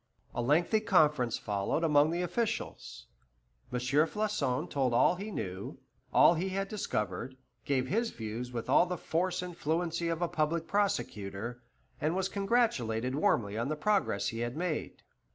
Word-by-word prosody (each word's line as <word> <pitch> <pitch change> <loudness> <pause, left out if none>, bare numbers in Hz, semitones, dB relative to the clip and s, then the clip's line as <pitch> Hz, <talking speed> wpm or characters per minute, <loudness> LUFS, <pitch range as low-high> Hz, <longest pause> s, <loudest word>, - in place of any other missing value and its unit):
A - - -1
lengthy 165 - +3
conference 150 - +3
followed 100 +10 -1
among 150 -1 +4
the 175 +2 -1
officials. 210 +6 -3 0.7
M. 125 - -1
Floçon 145 - 0
told 130 -4 0
all 170 - +5
he 200 +4 -6
knew, 95 - -5 0.3
all - - +7
he 175 +3 -1
had 195 +1 -2
discovered, 130 - -3 0.3
gave 130 -3 +1
his 225 - 0
views 115 - -5
with 120 -2 -4
all 145 +7 +5
the 180 0 -3
force 180 +3 -1
and 180 -1 -7
fluency 170 +1 -1
of 165 +1 -1
a - - +2
public 160 +1 0
prosecutor, 120 - -2 0.4
and 155 +3 +1
was 190 0 0
congratulated 185 - +1
warmly 110 -7 +1
on 115 - -1
the 155 - 0
progress 195 - +1
he 115 - -5
had 120 +3 -3
made. 170 -2 -3
155 Hz, 155 wpm, -31 LUFS, 120-180 Hz, 0.7 s, all